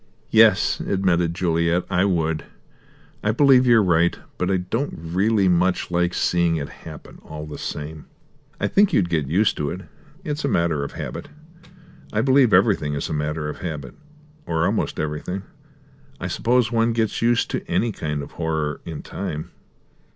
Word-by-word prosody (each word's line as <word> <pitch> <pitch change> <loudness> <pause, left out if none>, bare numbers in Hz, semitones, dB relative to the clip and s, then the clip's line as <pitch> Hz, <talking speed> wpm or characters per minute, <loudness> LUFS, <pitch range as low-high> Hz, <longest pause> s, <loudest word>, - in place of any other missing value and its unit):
"Yes," 110 -3 +5
admitted 90 -3 0
Juliet, 85 0 +1
"I 90 +2 +2
would. 80 -5 0 0.8
I 105 - +2
believe 130 +1 +5
you're 115 -3 +6
right. 85 -1 +2 0.2
But 90 - 0
I 95 - +2
don't 115 +10 -3
really 95 +5 +1
much 90 0 +1
like 85 0 +1
seeing 85 -1 +2
it 70 -3 -4
happen, - - -12
all 75 -1 -8
the 75 - -8
same." 75 +1 -6 0.5
"I - - 0
think 205 0 +3
you'd 85 -3 +2
get 80 -5 0
used 95 +9 +2
to 75 -1 -1
it; - - -5 0.4
it's 150 0 -3
a - - +1
matter 85 - +1
of 70 - -6
habit. - - -6 0.8
I 105 - +1
believe 130 -1 +4
everything 95 -7 +3
is 70 - -3
a - - -2
matter 75 +1 -2
of 75 - -6
habit, 75 -7 -5 0.5
or 80 0 +1
almost - - -1
everything. 75 +5 -3 0.8
I - - -5
suppose 120 0 +1
one 115 0 +2
gets 115 -2 -1
used 120 0 +2
to - - -2
any 115 0 +1
kind 75 -6 -3
of - - -10
horror 80 -3 -2
in 80 -3 -6
time." 75 +1 -5
90 Hz, 165 wpm, -22 LUFS, 80-110 Hz, 0.8 s, you're